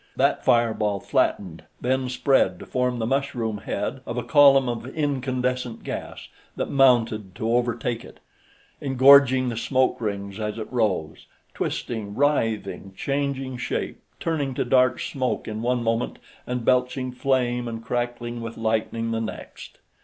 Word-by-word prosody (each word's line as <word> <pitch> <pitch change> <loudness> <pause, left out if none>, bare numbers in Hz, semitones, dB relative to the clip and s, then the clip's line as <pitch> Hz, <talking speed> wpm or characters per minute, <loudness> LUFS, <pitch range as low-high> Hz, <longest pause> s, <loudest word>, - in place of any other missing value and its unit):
That - - +2
fireball 110 -4 +2
flattened, 90 -3 0 0.2
then 130 +1 0
spread 135 +2 +2
to - - -10
form 125 -1 -1
the 115 - -1
mushroom 120 -5 -1
head - - -3
of - - -4
a - - -1
column 140 -3 +6
of 120 0 -3
incandescent 125 -4 -1
gas - - -6 0.3
that - - -3
mounted 115 -8 +3
to 110 +2 -2
overtake 120 -1 0
it, - - -14 0.6
engorging 130 -1 +6
the 115 - -4
smoke 130 +1 +1
rings 100 -1 -4
as 105 0 -3
it 110 +2 -7
rose, 95 -10 -1 0.3
twisting, 105 -4 -4
writhing, 115 -8 0
changing 135 -2 -2
shape, - - -3 0.2
turning 145 -5 -1
to - - 0
dark 125 0 +3
smoke 130 -3 -2
in 110 0 -4
one 120 0 0
moment 115 +1 -1 0.3
and 125 -2 -3
belching 125 0 +1
flame 125 -2 0
and 115 -1 -6
crackling 120 0 -3
with 115 0 -6
lightning 115 +1 -1
the 115 0 -1
next. 110 - -8
120 Hz, 145 wpm, -24 LUFS, 115-130 Hz, 0.6 s, column